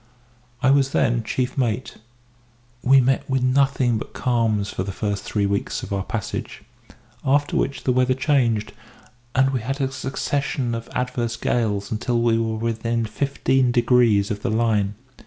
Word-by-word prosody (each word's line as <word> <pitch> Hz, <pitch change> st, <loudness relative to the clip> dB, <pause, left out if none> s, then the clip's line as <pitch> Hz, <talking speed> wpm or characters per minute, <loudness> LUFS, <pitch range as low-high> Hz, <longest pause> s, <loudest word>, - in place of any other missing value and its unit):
I 130 Hz, -, +5 dB
was 135 Hz, -1 st, +3 dB
then 120 Hz, 0 st, +2 dB
chief 125 Hz, +4 st, -2 dB
mate. 120 Hz, 0 st, -1 dB, 0.8 s
We 135 Hz, +2 st, +6 dB
met 130 Hz, +1 st, +1 dB
with 130 Hz, -1 st, +1 dB
nothing 130 Hz, -3 st, +2 dB
but -, -, -9 dB
calms 110 Hz, -5 st, 0 dB
for -, -, -4 dB
the 95 Hz, +1 st, -3 dB
first 100 Hz, 0 st, -2 dB
three 100 Hz, -1 st, -1 dB
weeks 100 Hz, 0 st, -2 dB
of -, -, -5 dB
our 100 Hz, -, 0 dB
passage, 105 Hz, +2 st, -5 dB, 0.6 s
after 145 Hz, +2 st, +1 dB
which 135 Hz, -, -1 dB
the 130 Hz, -, +2 dB
weather 130 Hz, 0 st, +2 dB
changed, 130 Hz, -6 st, +1 dB, 0.6 s
and 135 Hz, +1 st, +4 dB
we 130 Hz, -3 st, -1 dB
had 135 Hz, +5 st, -3 dB
a 135 Hz, -1 st, 0 dB
succession 135 Hz, -2 st, -2 dB
of 115 Hz, 0 st, -5 dB
adverse 125 Hz, -2 st, -2 dB
gales 105 Hz, -4 st, -1 dB
until 120 Hz, +2 st, 0 dB
we 115 Hz, -1 st, +2 dB
were 110 Hz, -1 st, -1 dB
within 115 Hz, +1 st, -1 dB
fifteen 130 Hz, +1 st, +1 dB
degrees 120 Hz, -4 st, +3 dB
of 100 Hz, 0 st, -3 dB
the -, -, -1 dB
line. 110 Hz, -2 st, +1 dB
120 Hz, 160 wpm, -22 LUFS, 110-130 Hz, 0.8 s, We